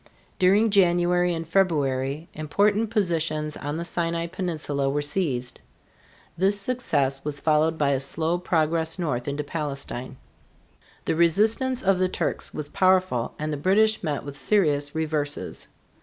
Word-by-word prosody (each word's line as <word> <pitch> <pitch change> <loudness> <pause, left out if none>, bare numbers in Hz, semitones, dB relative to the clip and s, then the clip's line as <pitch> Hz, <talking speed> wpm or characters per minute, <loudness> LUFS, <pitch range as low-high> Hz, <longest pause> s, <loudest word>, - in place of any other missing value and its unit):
During 205 +4 +4
January 175 -2 +3
and 165 -1 -4
February 150 -5 0
important 205 +8 +1
positions 165 -7 -1
on 145 +2 -4
the 170 - -4
Sinai 170 -1 -1
peninsula 155 -6 -2
were 145 +2 0
seized. 145 -6 -2 0.8
This 195 +4 +2
success 145 - 0
was 145 -1 -4
followed 155 +1 +2
by 145 -2 +2
a 135 - +1
slow 160 +5 -1
progress 165 -1 0
north 130 -9 -2
into 145 +1 -2
Palestine. 140 -4 -5 0.9
The - - 0
resistance 220 +10 +2
of 195 -1 +3
the 185 0 +2
Turks - - -3
was 150 -1 -5
powerful 185 -8 +1
and 155 0 -3
the - - -2
British 215 +7 +2
met 150 -5 -2
with 140 0 -8
serious 145 -5 +1
reverses. 150 -2 -3
160 Hz, 140 wpm, -25 LUFS, 145-185 Hz, 0.9 s, During